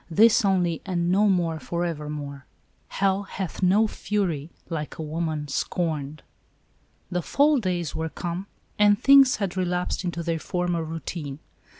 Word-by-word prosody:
This 215 +7 +5
only, 180 -4 +1
and 175 -2 -1
no 205 +3 +4
more 170 -4 +1
forevermore." 150 -5 -4 0.2
" - - -40
Hell 195 0 +1
hath 190 -3 -6
no 195 +4 +4
fury 185 -8 -2 0.2
like 155 -3 -5
a 160 - -4
woman 155 -1 -3
scorned." 150 -1 -2 0.9
The 180 0 0
fall 285 - +3
days 175 -6 -2
were 160 0 -2
come, 175 +4 -5 0.3
and 205 0 +6
things 275 -2 +7
had 195 -4 -3
re 185 - +1
lapsed 180 +1 -1
into 170 -1 -3
their 165 -1 -1
former 175 0 -1
routine. 160 -3 -5
175 Hz, 150 wpm, -25 LUFS, 160-195 Hz, 0.9 s, things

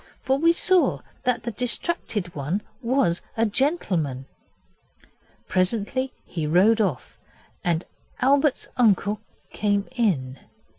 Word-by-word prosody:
For 265 +1 +1
we 330 +2 +5
saw 365 +1 +2 0.2
that 250 -1 +1
the 235 - -3
distracted 230 - -2
one 155 +8 -2 0.2
was 235 -8 +1 0.2
a 225 - +3
gentleman. 190 - 0 1.2
Presently 220 +7 0
he 160 -4 -3
rode 200 +8 +4
off, 175 - -2 0.4
and 170 -1 0 0.3
Albert's 280 +1 +2
uncle 210 -3 +3 0.3
came 205 -1 0
in. 155 - 0
210 Hz, 105 wpm, -24 LUFS, 175-260 Hz, 1.2 s, we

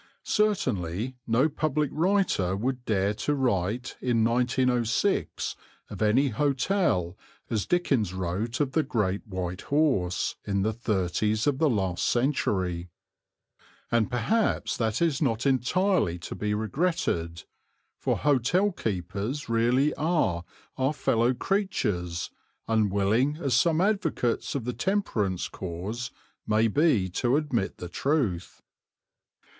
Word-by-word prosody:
Certainly 125 - 0
no 120 +6 +3
public 150 -1 -1
writer 170 - +1
would 125 +4 -2
dare 100 -1 +1
to 145 +7 -1
write 120 -2 -1
in 120 -3 +2
1906 120 0 +1 0.4
of - - -7
any 120 +7 +3
hotel 135 - +1 0.4
as 110 -3 -1
Dickens 135 - +1
wrote 95 +5 -3
of 145 -3 +1
the 160 - +2
"Great 110 -8 -1
White 90 -1 -4
Horse" 135 - +1
in 100 -1 0
the 110 +2 0
thirties 105 0 0
of 140 -2 +1
the 155 - +4
last 95 -7 0
century; 95 -9 0 1.0
and 115 -2 +2
perhaps 200 - 0
that 110 +6 0
is 160 -3 +1
not 125 -4 0
entirely 135 - +2
to 85 - -7
be 105 0 -1
regretted, 105 - -1 0.6
for - - 0
hotel 150 - +2
keepers 105 - -3
really 120 +6 +2
are 150 - 0 0.4
our 135 +3 +2
fellow 120 -3 +1
creatures, 100 - -1 0.4
unwilling 110 +6 +2
as 140 -6 -1
some 160 +7 +3
advocates 180 - 0
of 130 -5 -2
the 125 - -2
Temperance 115 - -1
Cause 100 +7 -5 0.4
may 110 +1 +3
be 120 - +3
to 120 +8 +1
admit 125 -10 -1
the 90 - -6
truth. 110 - -1
120 Hz, 120 wpm, -27 LUFS, 100-145 Hz, 1.0 s, the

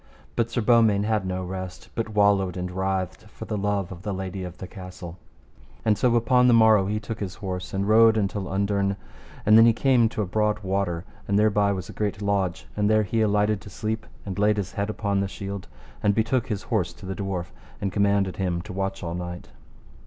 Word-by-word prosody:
But 115 0 +1
Sir 120 +1 -1
Beaumains 110 -3 +4
had 105 -3 0
no 95 0 -2
rest, 95 0 -6
but 115 -1 -2
wallowed 100 -3 +3
and 90 0 -3
writhed 95 0 -2
for - - -9
the - - -3
love 100 -2 -1
of 90 -2 -8
the 100 -1 -3
lady 95 0 -4
of 90 -1 -7
the 95 - -7
castle. 90 -2 -9 0.7
And 110 -1 +4
so 120 +2 +2
upon 125 +2 +4
the 120 - +6
morrow 110 -4 +5
he 105 +1 -1
took 110 +1 -6
his 100 -2 -4
horse 90 -2 -5
and 100 +1 -1
rode 110 +1 +6
until 100 -2 -1
underne, 100 0 0 0.5
and 105 - +6
then 115 - +8
he 115 - +5
came 120 -1 +3
to 110 - -2
a - - -2
broad 105 +3 +1
water, 95 -3 -1 0.2
and 100 - +2
thereby 105 -1 +3
was 95 -2 -4
a - - -9
great 100 -2 -2
lodge, 95 -3 -1
and 105 0 +1
there 110 0 +4
he 110 +3 0
alighted 105 -1 +2
to - - -11
sleep 110 +3 -4 0.2
and 100 0 -4
laid 105 +1 +3
his 100 -2 -2
head 100 +1 -2
upon 100 -2 -1
the 100 - 0
shield, 100 0 -6 0.3
and 100 -1 +2
betook 115 +2 +1
his 105 -3 -3
horse 90 -8 -1
to 100 - -13
the 95 - -3
dwarf, 95 -3 -4 0.3
and 100 - -2
commanded 100 -1 +2
him 90 -3 -1
to - - -8
watch 95 0 -3
all 85 -1 -3
night. 90 0 -6
100 Hz, 220 wpm, -25 LUFS, 95-110 Hz, 0.7 s, then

